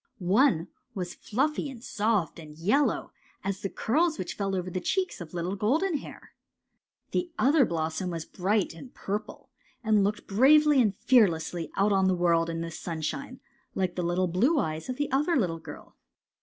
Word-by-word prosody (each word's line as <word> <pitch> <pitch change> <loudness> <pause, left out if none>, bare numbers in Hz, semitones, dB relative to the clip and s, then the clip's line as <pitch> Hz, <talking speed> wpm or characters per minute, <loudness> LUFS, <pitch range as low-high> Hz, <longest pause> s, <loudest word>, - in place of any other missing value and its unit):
One 220 - +4 0.3
was 180 -2 -4
fluffy 285 +6 -1
and 245 -3 -10
soft 210 - 0
and 155 -2 -12
yellow 215 - +1 0.3
as 195 0 -3
the 195 - -2
curls 315 - +1
which 185 -3 -4
fell 195 -1 -2
over 180 0 -3
the 185 - -3
cheeks 375 - -1
of 165 0 -9
little 175 +3 -2
Golden 300 - +1
Hair. - - -11 0.8
The 355 - -1
other 280 +1 +4
blossom 160 +1 -2
was 165 -2 -4
bright 195 +1 0
and 245 +10 -11
purple, 210 +2 -5 0.3
and 215 -2 +3
looked 210 +1 -1
bravely 285 +6 +5
and 210 -5 +1
fearlessly 175 -8 +2
out 200 +2 +2
on 190 -1 +3
the 185 - +3
world 170 -1 +2
and 165 0 -3
the 165 - -5
sunshine, 170 - -5 0.3
like 185 -2 0
the 180 - -3 0.3
blue 230 - +2
eyes 160 - -2
of 255 - -3
the 290 -2 -2
other 295 +6 +2
little 175 -9 0
girl. - - -11
200 Hz, 170 wpm, -28 LUFS, 175-260 Hz, 0.8 s, bravely